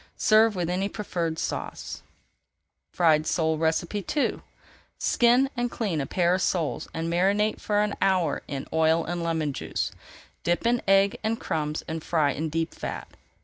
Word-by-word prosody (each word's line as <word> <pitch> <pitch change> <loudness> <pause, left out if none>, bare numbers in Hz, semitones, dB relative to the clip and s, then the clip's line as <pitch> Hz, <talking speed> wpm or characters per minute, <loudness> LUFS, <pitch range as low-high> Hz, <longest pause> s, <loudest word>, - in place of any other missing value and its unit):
Serve 215 0 +4
with 175 -2 -1
any 185 +3 -1
preferred 170 -7 -3
sauce. - - -4 0.9
FRIED 155 -3 +3
SOLE 160 -1 0
II 175 - 0 0.6
Skin 245 +3 +4
and 245 -1 -1
clean 195 -11 -2
a 135 - -3
pair 175 -1 +2
of 185 - 0
soles 170 -6 -1
and 165 0 -3
marinate 195 +5 +1
for 210 -1 +1
an 210 - -1
hour 185 -3 +2
in 140 -2 -4
oil 160 +1 +3
and 175 0 -3
lemon 160 -3 -1
juice. - - -3 0.5
Dip 175 +5 0
in 240 0 +2
egg 195 +1 +4
and 225 +1 0
crumbs 150 -1 -2
and 160 0 -4
fry 155 -4 +2
in 155 +4 -3
deep 165 +1 -2
fat. - - -6
175 Hz, 155 wpm, -26 LUFS, 160-205 Hz, 0.9 s, Serve